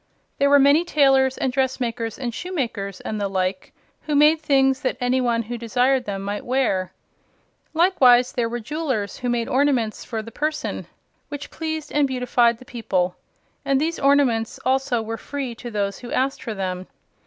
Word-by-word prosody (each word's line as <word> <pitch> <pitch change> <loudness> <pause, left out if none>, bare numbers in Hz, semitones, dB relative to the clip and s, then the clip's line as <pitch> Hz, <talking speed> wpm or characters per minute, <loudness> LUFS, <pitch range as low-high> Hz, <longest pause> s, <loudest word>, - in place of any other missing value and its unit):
There 280 0 +4
were 285 - +7
many 285 +4 +5
tailors 270 -5 +3
and 260 - -1
dressmakers 245 -4 -1
and 245 -3 -4
shoemakers 230 - -4
and 215 -1 -4
the 200 - 0
like, 185 -1 -2 0.4
who 300 - 0
made 305 +2 +5
things 270 -2 +2
that 260 - -1
any 250 +1 +1
who 235 -1 -1
desired 250 +3 +1
them 195 -1 -4
might 205 +1 -4
wear. 240 -8 0 0.8
Likewise 255 -8 +5
there 235 -2 -1
were 240 +1 -3
jewelers 240 - -3
who 250 - -2
made 235 -1 0
ornaments 260 -5 +1
for 225 -2 -4
the 230 - -10
person, 305 +4 -3 0.4
which 290 -1 -7
pleased 315 -1 -4
and 290 -1 +2
beautified 245 -2 +2
the 255 - -15
people, 185 -7 -1 0.5
and 275 -1 +2
these 330 +3 -1
ornaments 270 -5 +2
also 260 -3 +1
were 225 +1 -4
free 270 +1 -5
to 240 +1 -8
those 200 -3 -2
who 245 - -9
asked 270 +1 0
for 225 -3 -5
them. 185 -1 -4
250 Hz, 170 wpm, -22 LUFS, 225-275 Hz, 0.8 s, were